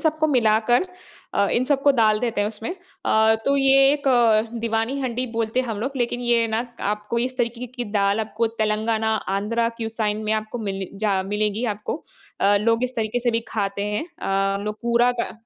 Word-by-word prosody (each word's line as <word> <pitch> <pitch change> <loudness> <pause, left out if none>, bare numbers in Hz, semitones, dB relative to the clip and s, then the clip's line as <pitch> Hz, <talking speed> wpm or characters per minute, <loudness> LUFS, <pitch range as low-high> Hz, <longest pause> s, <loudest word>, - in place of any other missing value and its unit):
सबको 310 -1 +1
मिलाकर 235 - +3 0.5
अ, 200 0 +3
इन 250 - +2
सबको 285 0 +3
डाल 220 -4 +3
देते 235 -4 -1
हैं 205 - +1
उसमें। 220 +1 -6 0.4
अ, 220 0 +4
तो 280 0 +2
ये 270 0 +5
एक 290 -1 -3 0.6
दीवानी 230 +4 -1
हंडी 255 -1 -2
बोलते 225 +2 0
हैं 255 - -4
हम 215 -3 -3
लोग, 265 +5 -2
लेकिन 240 0 -1
ये 235 -1 +2
ना 220 0 0 0.3
आपको 210 +2 -2
इस 255 +2 -2
तरीके 240 +1 -2
की 245 0 -6
दाल 200 +1 +2
आपको 220 +1 -1
तेलंगाना, 220 +1 +1
आन्ध्रा 215 +3 -1
क्यू 225 -1 -3
साइन 215 -1 -2
में 215 - 0
आपको 215 +2 -2
मिले 195 -1 -4
जा 200 -3 +1
मिलेगी 210 +3 -1
आपको, 210 +6 -4 0.4
अ, 205 +1 +4
लोग 230 +3 +2
इस 255 - -4
तरीके 225 +2 -1
से 240 - +1
भी 230 0 0
खाते 200 -1 -2
हैं 215 +11 -2
अ, 195 - -1
लोग 210 0 -4
कूरा 235 +1 +3
का - - -2
225 Hz, 195 wpm, -23 LUFS, 210-245 Hz, 0.6 s, ये